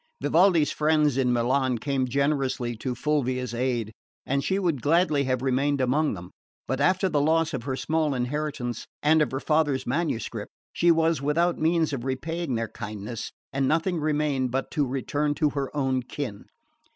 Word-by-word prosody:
Vivaldi's 170 Hz, -3 st, +4 dB
friends 150 Hz, -2 st, +2 dB
in 130 Hz, -2 st, +2 dB
Milan 125 Hz, +1 st, +1 dB
came 135 Hz, +1 st, -1 dB
generously 135 Hz, -3 st, 0 dB
to 125 Hz, +2 st, -3 dB
Fulvia's 130 Hz, -3 st, -1 dB
aid, 120 Hz, -3 st, -1 dB, 0.3 s
and 140 Hz, +1 st, 0 dB
she 190 Hz, +6 st, 0 dB
would 170 Hz, -9 st, 0 dB
gladly 155 Hz, -1 st, +2 dB
have 130 Hz, -1 st, -1 dB
remained 135 Hz, +2 st, +1 dB
among 135 Hz, +2 st, +1 dB
them; 90 Hz, 0 st, -10 dB, 0.4 s
but 130 Hz, +2 st, -1 dB
after 185 Hz, +5 st, +3 dB
the 150 Hz, -5 st, +1 dB
loss 160 Hz, +2 st, +2 dB
of 115 Hz, -, -4 dB
her 135 Hz, -, -1 dB
small 155 Hz, 0 st, 0 dB
inheritance 125 Hz, -1 st, -3 dB, 0.2 s
and 155 Hz, +1 st, +5 dB
of 150 Hz, -, +2 dB
her 130 Hz, +2 st, -3 dB
father's 150 Hz, -4 st, +1 dB
manuscript 120 Hz, -7 st, -2 dB, 0.2 s
she 175 Hz, -, +3 dB
was 165 Hz, -3 st, +3 dB
without 165 Hz, +5 st, +1 dB
means 160 Hz, -1 st, +2 dB
of 125 Hz, -4 st, -3 dB
repaying 140 Hz, +3 st, -2 dB
their 115 Hz, 0 st, -1 dB
kindness, 105 Hz, +1 st, -6 dB, 0.2 s
and 135 Hz, 0 st, +1 dB
nothing 165 Hz, +3 st, +1 dB
remained 150 Hz, -4 st, 0 dB
but 130 Hz, +2 st, -2 dB
to 135 Hz, -3 st, 0 dB
turn 145 Hz, 0 st, 0 dB
to 150 Hz, -2 st, +1 dB
her 140 Hz, -2 st, -2 dB
own 130 Hz, -2 st, +1 dB
kin. 125 Hz, -4 st, -6 dB
140 Hz, 170 wpm, -26 LUFS, 125-155 Hz, 0.4 s, and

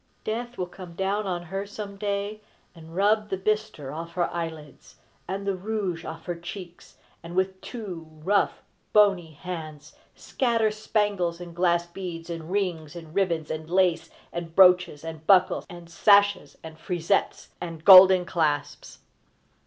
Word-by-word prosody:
Death 240 Hz, +3 st, -4 dB
will 180 Hz, -, -1 dB
come 180 Hz, -1 st, -11 dB
down 195 Hz, +3 st, -1 dB
on 175 Hz, -2 st, -3 dB
her 195 Hz, +3 st, -4 dB
some 205 Hz, -1 st, -7 dB
day, 205 Hz, +1 st, -3 dB, 0.3 s
and 165 Hz, -1 st, -13 dB
rub 210 Hz, +2 st, +2 dB
the 190 Hz, -, -2 dB
bistre 210 Hz, -8 st, -2 dB
off 165 Hz, +2 st, -7 dB
her 175 Hz, 0 st, 0 dB
eyelids, 160 Hz, -4 st, -7 dB, 0.3 s
and 195 Hz, +2 st, -4 dB
the 200 Hz, -, 0 dB
rouge 190 Hz, -3 st, -3 dB
off 160 Hz, -, -8 dB
her 175 Hz, -, -2 dB
cheeks, 175 Hz, +1 st, -10 dB, 0.2 s
and 170 Hz, +1 st, -9 dB
with 190 Hz, 0 st, 0 dB
two 185 Hz, -9 st, -7 dB
rough, 165 Hz, +6 st, 0 dB, 0.3 s
bony 195 Hz, -6 st, +4 dB
hands, 155 Hz, -2 st, -8 dB, 0.2 s
scatter 230 Hz, -4 st, 0 dB
spangles 205 Hz, -5 st, -1 dB
and 175 Hz, -1 st, -9 dB
glass 175 Hz, -1 st, +2 dB
beads 175 Hz, -1 st, -7 dB
and 165 Hz, -1 st, -6 dB
rings 175 Hz, -6 st, -2 dB
and 165 Hz, -2 st, -10 dB
ribbons 170 Hz, -5 st, 0 dB
and 155 Hz, 0 st, -5 dB
lace 180 Hz, -2 st, +2 dB, 0.2 s
and 170 Hz, -1 st, -6 dB
brooches 180 Hz, -5 st, +5 dB
and 160 Hz, -1 st, -8 dB
buckles 190 Hz, -2 st, +4 dB
and 175 Hz, -1 st, -11 dB
sashes 200 Hz, -2 st, +3 dB
and 160 Hz, 0 st, -10 dB
frisettes 175 Hz, +3 st, -1 dB
and 165 Hz, -2 st, -7 dB
golden 185 Hz, -1 st, +9 dB
clasps. 155 Hz, -5 st, -2 dB
180 Hz, 150 wpm, -26 LUFS, 165-200 Hz, 0.3 s, golden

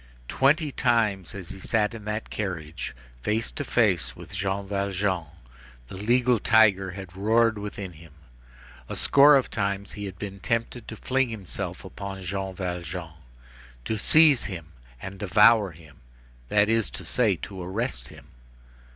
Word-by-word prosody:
Twenty 150 Hz, +3 st, +2 dB
times, 115 Hz, -7 st, +1 dB
as 95 Hz, -3 st, -7 dB
he -, -, -8 dB
sat 105 Hz, +2 st, 0 dB
in 110 Hz, -2 st, -9 dB
that 105 Hz, +1 st, -4 dB
carriage 85 Hz, -10 st, -4 dB, 0.3 s
face 110 Hz, -, -1 dB
to -, -, -4 dB
face 90 Hz, -, +1 dB
with -, -, -12 dB
Jean 95 Hz, +1 st, -2 dB
Valjean, 100 Hz, -3 st, -1 dB, 0.6 s
the -, -, -8 dB
legal 120 Hz, +4 st, +2 dB
tiger 100 Hz, -5 st, +4 dB
had 95 Hz, -2 st, -9 dB
roared 110 Hz, +2 st, +2 dB
within 100 Hz, -2 st, -6 dB
him. 80 Hz, -1 st, -15 dB, 0.8 s
A -, -, -4 dB
score 140 Hz, +1 st, +6 dB
of 135 Hz, -, +1 dB
times 100 Hz, 0 st, -2 dB
he 105 Hz, -1 st, -6 dB
had 95 Hz, -2 st, -7 dB
been 100 Hz, -1 st, -7 dB
tempted 115 Hz, +3 st, -2 dB
to 110 Hz, -, -6 dB
fling 130 Hz, +2 st, 0 dB
himself 105 Hz, -5 st, -5 dB
upon 100 Hz, -1 st, -7 dB
Jean 95 Hz, +1 st, -4 dB
Valjean, 90 Hz, -2 st, -5 dB, 0.7 s
to 110 Hz, -, -1 dB
seize 155 Hz, +1 st, +5 dB
him 85 Hz, -6 st, -6 dB, 0.3 s
and 95 Hz, +7 st, -8 dB
devour 105 Hz, +2 st, +5 dB
him, 80 Hz, -3 st, -16 dB, 0.5 s
that 105 Hz, 0 st, +4 dB
is 115 Hz, -1 st, +1 dB
to -, -, -7 dB
say, 110 Hz, -6 st, +2 dB
to 95 Hz, +3 st, -8 dB
arrest 105 Hz, +8 st, -3 dB
him. -, -, -14 dB
100 Hz, 150 wpm, -26 LUFS, 95-115 Hz, 0.8 s, score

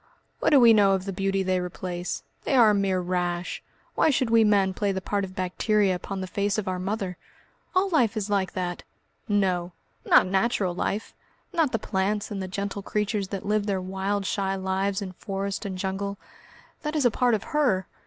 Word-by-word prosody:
"What -, -, +2 dB
do 290 Hz, -, +6 dB
we 235 Hz, -2 st, +8 dB
know 200 Hz, -2 st, +5 dB
of 190 Hz, -1 st, -1 dB
the 195 Hz, -, -3 dB
beauty 195 Hz, 0 st, 0 dB
they 185 Hz, -1 st, +1 dB
replace? 180 Hz, 0 st, -4 dB, 0.2 s
They 280 Hz, -, 0 dB
are 230 Hz, -4 st, +7 dB
a -, -, +2 dB
mere 195 Hz, -2 st, +1 dB
rash. 175 Hz, 0 st, -2 dB, 0.3 s
Why -, -, +3 dB
should 255 Hz, -4 st, +1 dB
we 230 Hz, -1 st, +6 dB
men 200 Hz, -3 st, +3 dB
play 200 Hz, +1 st, 0 dB
the 190 Hz, -, -2 dB
part 200 Hz, +2 st, -1 dB
of 185 Hz, -1 st, -7 dB
bacteria 195 Hz, +2 st, +1 dB
upon 190 Hz, +2 st, -5 dB
the -, -, -3 dB
face 200 Hz, +2 st, -1 dB
of 210 Hz, -2 st, -2 dB
our 185 Hz, -1 st, -1 dB
Mother?" 190 Hz, -1 st, -3 dB, 0.6 s
"All 375 Hz, +2 st, +4 dB
life 240 Hz, -, +2 dB
is 210 Hz, -, -1 dB
that!" 185 Hz, -3 st, -1 dB, 0.5 s
"No! 185 Hz, -4 st, +1 dB, 0.3 s
not -, -, +6 dB
natural 190 Hz, -1 st, +1 dB
life, 200 Hz, +4 st, -3 dB, 0.4 s
not 325 Hz, -6 st, +2 dB
the -, -, +1 dB
plants 205 Hz, +1 st, -1 dB
and 200 Hz, -2 st, -3 dB
the 190 Hz, -, -4 dB
gentle 200 Hz, +2 st, -4 dB
creatures 210 Hz, 0 st, -1 dB
that 195 Hz, -1 st, -5 dB
live 210 Hz, 0 st, 0 dB
their 195 Hz, -2 st, 0 dB
wild 195 Hz, +2 st, -2 dB
shy 195 Hz, 0 st, -1 dB
lives 190 Hz, +1 st, -1 dB
in 190 Hz, -, -6 dB
forest 195 Hz, +2 st, -4 dB
and 190 Hz, -2 st, -5 dB
jungle. 195 Hz, +1 st, -3 dB, 0.6 s
That 300 Hz, 0 st, -3 dB
is 295 Hz, -4 st, +2 dB
a 245 Hz, -, +5 dB
part 245 Hz, 0 st, +2 dB
of 210 Hz, -, -4 dB
her. 250 Hz, -12 st, +2 dB
195 Hz, 200 wpm, -26 LUFS, 185-210 Hz, 0.6 s, we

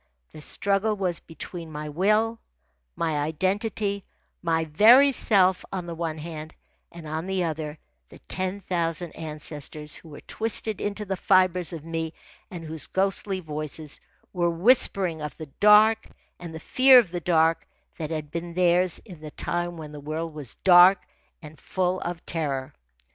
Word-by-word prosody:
The 155 Hz, -, -11 dB
struggle 200 Hz, +6 st, 0 dB
was 185 Hz, -4 st, -1 dB
between 165 Hz, 0 st, -9 dB
my 150 Hz, 0 st, -6 dB
will, 215 Hz, +8 st, +1 dB, 0.6 s
my 160 Hz, -3 st, -1 dB
identity, 200 Hz, +6 st, -1 dB, 0.4 s
my 165 Hz, -1 st, 0 dB
very 230 Hz, -, +6 dB
self, 190 Hz, -7 st, +4 dB
on 185 Hz, -2 st, -4 dB
the 170 Hz, -, -6 dB
one 165 Hz, -1 st, -4 dB
hand, 155 Hz, 0 st, -8 dB, 0.4 s
and 170 Hz, -2 st, -10 dB
on 160 Hz, +3 st, -4 dB
the 190 Hz, -1 st, -1 dB
other, 155 Hz, -2 st, -4 dB, 0.3 s
the -, -, -14 dB
ten 185 Hz, +2 st, -1 dB
thousand 170 Hz, -2 st, -2 dB
ancestors 150 Hz, -1 st, -5 dB
who 165 Hz, -, -8 dB
were 145 Hz, -, -11 dB
twisted 220 Hz, -2 st, -2 dB
into 205 Hz, +1 st, -3 dB
the 190 Hz, -1 st, -3 dB
fibres 185 Hz, -2 st, +2 dB
of 160 Hz, -3 st, -8 dB
me 165 Hz, -1 st, -4 dB, 0.4 s
and 175 Hz, -3 st, -8 dB
whose 160 Hz, -1 st, -3 dB
ghostly 195 Hz, 0 st, -1 dB
voices 155 Hz, -1 st, -6 dB, 0.3 s
were 175 Hz, -2 st, +1 dB
whispering 180 Hz, -3 st, +3 dB
of 150 Hz, 0 st, -6 dB
the 155 Hz, -4 st, -9 dB
dark 215 Hz, +2 st, +5 dB, 0.3 s
and 170 Hz, -2 st, -8 dB
the -, -, -6 dB
fear 260 Hz, +9 st, +6 dB
of 220 Hz, -9 st, +4 dB
the 175 Hz, -1 st, -4 dB
dark 165 Hz, 0 st, +2 dB, 0.3 s
that 155 Hz, -2 st, -4 dB
had 155 Hz, -2 st, -5 dB
been 170 Hz, +1 st, -6 dB
theirs 180 Hz, 0 st, +3 dB
in 180 Hz, -7 st, -12 dB
the 155 Hz, -, -8 dB
time 175 Hz, +3 st, -3 dB
when 155 Hz, -2 st, -8 dB
the 150 Hz, -, -9 dB
world 155 Hz, +3 st, -5 dB
was 145 Hz, -6 st, -8 dB
dark 180 Hz, +1 st, +7 dB, 0.4 s
and 155 Hz, 0 st, -12 dB
full 185 Hz, 0 st, -1 dB
of 170 Hz, -1 st, -5 dB
terror. 140 Hz, -5 st, -2 dB
170 Hz, 160 wpm, -25 LUFS, 155-190 Hz, 0.6 s, dark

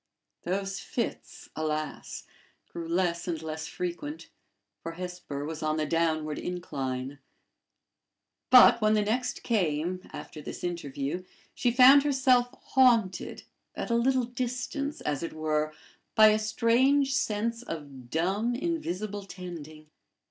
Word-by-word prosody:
Those 195 Hz, +2 st, -2 dB
fits, 235 Hz, -, -5 dB
alas! 155 Hz, -1 st, -3 dB, 0.4 s
grew 170 Hz, -1 st, -7 dB
less 170 Hz, 0 st, 0 dB
and 165 Hz, -3 st, -2 dB
less 160 Hz, 0 st, -5 dB
frequent; 180 Hz, -, -5 dB, 0.5 s
for 165 Hz, -, -5 dB
Hesper 180 Hz, -5 st, -6 dB
was 160 Hz, 0 st, -5 dB
on 155 Hz, 0 st, 0 dB
the 155 Hz, -, 0 dB
downward 155 Hz, -2 st, 0 dB
incline; 135 Hz, -6 st, -4 dB, 1.3 s
but, 250 Hz, -2 st, +8 dB
when 215 Hz, 0 st, +4 dB
the 210 Hz, -, +2 dB
next 245 Hz, +5 st, -1 dB
came, 180 Hz, -4 st, 0 dB
after 155 Hz, -, -8 dB
this -, -, -8 dB
interview, 165 Hz, -1 st, -3 dB, 0.3 s
she 245 Hz, -, +1 dB
found 255 Hz, +3 st, +8 dB
herself 260 Hz, -3 st, +3 dB, 0.2 s
haunted, 235 Hz, -8 st, +3 dB, 0.3 s
at -, -, -4 dB
a -, -, +3 dB
little 255 Hz, +1 st, +2 dB
distance, 250 Hz, +4 st, -3 dB
as 145 Hz, -2 st, -2 dB
it 170 Hz, -, -4 dB
were, 155 Hz, -1 st, 0 dB, 0.4 s
by 215 Hz, -1 st, +8 dB
a 215 Hz, 0 st, +3 dB
strange 260 Hz, +6 st, +3 dB
sense 230 Hz, -1 st, -1 dB
of 140 Hz, -, -8 dB
dumb, 195 Hz, -, 0 dB
invisible 215 Hz, -, -3 dB
tending. 155 Hz, -5 st, -9 dB
185 Hz, 125 wpm, -28 LUFS, 155-240 Hz, 1.3 s, but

